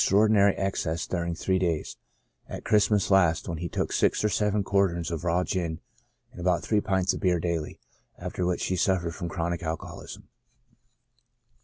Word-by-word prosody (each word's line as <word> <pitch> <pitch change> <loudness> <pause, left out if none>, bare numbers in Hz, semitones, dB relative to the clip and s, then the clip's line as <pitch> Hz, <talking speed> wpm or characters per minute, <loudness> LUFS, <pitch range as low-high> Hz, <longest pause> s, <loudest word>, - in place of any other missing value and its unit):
6l 105 +3 +4
traordinary 100 -2 +4
excess 85 -5 -1
during 85 -2 -2
three 95 +2 0
days, 85 -4 -1 0.5
at - - -7
Christmas 105 -1 +3
last^ 90 -4 +3
when 85 -3 -4
he 85 0 -4
took - - -2
six - - +2
or 105 - +3
seven 105 +1 +1
quarterns 95 -4 +1
of 85 -1 -4
raw 90 +1 +1
gin 85 -4 -2 0.5
and 90 - -10
about 85 -2 +1
three 105 -2 +1
pints 95 -2 +1
of - - -5
beer 90 -3 +2
daily, 85 -2 -3 0.4
after 90 - -4
which 90 0 0
he 95 - 0
suffered 90 -2 +1
from 85 -1 -5
chronic 85 +1 -2
alcoholism. 80 -2 -6
90 Hz, 170 wpm, -27 LUFS, 85-95 Hz, 0.5 s, 6l